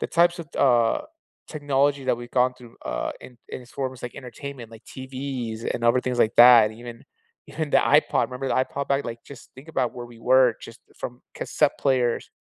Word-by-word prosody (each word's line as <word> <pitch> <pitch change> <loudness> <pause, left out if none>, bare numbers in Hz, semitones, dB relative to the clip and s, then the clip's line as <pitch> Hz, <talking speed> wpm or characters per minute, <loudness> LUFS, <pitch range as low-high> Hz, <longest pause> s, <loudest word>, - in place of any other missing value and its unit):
the - - -1
types 170 +1 +3
of 165 - -9
th - - -3
uh, 120 - +3 0.5
technology 145 -2 0
that 130 - +1
we've 120 0 -9
gone 125 +1 +3
through, 120 -2 -15
uh, - - -3
in 125 - -13
in - - -6
its 125 - -18
forms, 130 -2 -5
like 120 - -7
entertainment, 130 -2 -9
like 115 0 -14
TVs, 130 -4 -6
and 120 - -4
other 120 +2 +4
things 125 -1 -2
like 110 - +2
that, 120 -3 +8
and 110 - -13
even 120 -1 -10 0.4
even 155 -2 -4
the - - +4
iPod 145 +2 +3
remember 130 +1 -4
the - - 0
iPod? 140 +1 -5
Back 140 0 +1
like, 115 0 -6
just 135 - -14
think 140 +5 -13
about 130 -6 -1
where 120 -1 -7
we 120 -1 -15
were 130 -1 +4
just 115 - -11 0.2
from 125 +1 -6
cassette 150 -2 0
players, 125 -4 0
125 Hz, 210 wpm, -24 LUFS, 120-140 Hz, 0.5 s, that